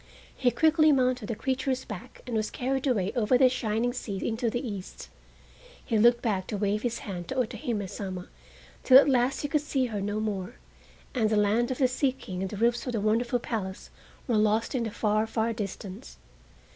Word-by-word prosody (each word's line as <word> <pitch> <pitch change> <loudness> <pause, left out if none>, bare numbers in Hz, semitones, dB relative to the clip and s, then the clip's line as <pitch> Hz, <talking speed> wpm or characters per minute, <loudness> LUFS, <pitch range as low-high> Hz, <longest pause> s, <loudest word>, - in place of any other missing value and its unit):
He 255 - +2
quickly 310 +5 +4
mounted 255 -4 +1
the 230 - -2
creature's 260 +2 -1
back 210 -6 -9
and 245 - -4
was 215 -1 0
carried 265 +2 -2
away 205 -7 +1
over 240 +1 +3
the 260 0 +6
shining 240 -1 -1
sea 200 -6 -4
into 230 +1 0
the 245 +3 -3
East. 200 -4 -7 0.8
He 225 -3 +1
looked 235 +2 +5
back 195 -5 -1
to 210 - -3
wave 205 +1 0
his 235 -1 -1
hand 180 -4 -5
to 265 - -4
Otohime 230 -4 -2
Sama 185 -2 -6 0.6
till 260 - +8
at 280 - +7
last 255 -1 +2
he 290 - -1
could 300 0 +1
see 275 -3 0
her 205 - -2
no 205 +2 -2
more, 210 0 -3 0.6
and 225 -5 +1
the 215 - +2
land 210 +4 +2
of 260 - -2
the 260 - +4
Sea 255 +1 0
King 185 -8 -7
and 190 - -2
the 205 - -6
roofs 235 +4 +1
of 250 - -2
the 225 - 0
wonderful 230 +4 +1
palace 205 -6 -5 0.4
were 235 -4 +2
lost 215 +3 +2
in 245 -3 0
the - - -2
far, 215 0 0
far 225 +1 0
distance. 200 0 -7
230 Hz, 205 wpm, -28 LUFS, 210-255 Hz, 0.8 s, till